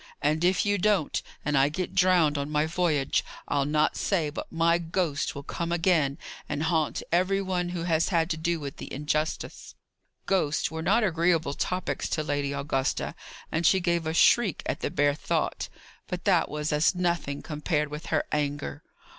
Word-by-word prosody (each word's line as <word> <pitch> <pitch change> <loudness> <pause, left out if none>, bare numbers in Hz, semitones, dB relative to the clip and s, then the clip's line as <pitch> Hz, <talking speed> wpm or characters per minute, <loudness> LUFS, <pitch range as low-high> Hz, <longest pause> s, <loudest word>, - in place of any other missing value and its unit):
And 155 +3 +1
if 180 +3 +3
you 205 -1 +1
don't, 195 -5 +1 0.2
and 150 0 +1
I 135 +1 +4
get 180 +4 -4
drowned 180 -5 +4
on 140 0 -2
my 150 0 +1
voyage, 160 -4 +1 0.2
I'll 140 -1 +1
not 150 +1 +2
say 165 -7 0
but - - -7
my 170 +1 +3
ghost 165 -4 -1
will 140 - -6
come 170 +4 -4
again 165 -5 +2 0.3
and 150 +1 -2
haunt 160 -2 0
every 185 +3 +2
one 185 -2 -1
who 175 -1 -3
has 165 -2 +1
had 165 -3 +2
to - - +1
do 170 +1 -1
with 140 -2 -6
the - - -8
injustice." 150 +2 -3 0.5
Ghosts 160 -6 +1
were 160 0 -4
not 205 +8 +3
agreeable 170 -5 +2
topics 180 +4 -2
to 155 - -1
Lady 145 -2 -1
Augusta, 140 -1 -1 0.4
and 160 - 0
she 190 +3 +5
gave 170 -2 0
a 160 - -1
shriek 210 -2 +4
at - - -2
the - - -2
bare 145 0 +2
thought. 150 - -2 0.4
But - - -4
that - - +3
was 150 0 -2
as 150 +5 +3
nothing, 170 -5 -1
compared 150 -1 -1
with 150 +2 -7
her 155 -2 +1
anger. 145 0 -2
160 Hz, 180 wpm, -27 LUFS, 150-175 Hz, 0.5 s, she